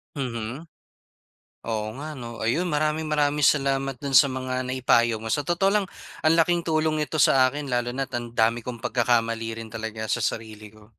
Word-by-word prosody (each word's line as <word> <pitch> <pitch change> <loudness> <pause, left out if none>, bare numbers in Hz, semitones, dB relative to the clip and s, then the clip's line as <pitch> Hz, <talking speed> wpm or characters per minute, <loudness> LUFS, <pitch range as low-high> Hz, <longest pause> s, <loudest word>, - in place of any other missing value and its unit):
Mhm. 125 0 -4 1.0
Oo 110 -2 -2
nga, 155 +3 -6
'no? 120 -4 -8
Ayun, 165 +11 +1
maraming 155 0 0
maraming 150 -1 +1
salamat 135 -1 +2
doon 140 +2 -5
sa 140 +2 +7
mga 130 -1 -3
naipayo 120 -3 +2
mo. 110 0 -4
Sa - - +1
totoo 175 +6 +1
lang, 205 -2 +1 0.4
ang 155 +1 +4
laking 170 +1 +3
tulong 155 -1 0
nito 150 +1 -2
sa'kin 135 0 +3
lalo 120 0 0
na't 135 -1 -3
ang 120 -1 -5
dami 115 +1 +2
kong 120 0 -8
pagkakamali 115 -2 0
rin 115 -1 -8
talaga 110 0 -5
sa - - -1
sarili 110 -1 -4
ko. 110 0 -19
130 Hz, 175 wpm, -25 LUFS, 115-150 Hz, 1.0 s, sa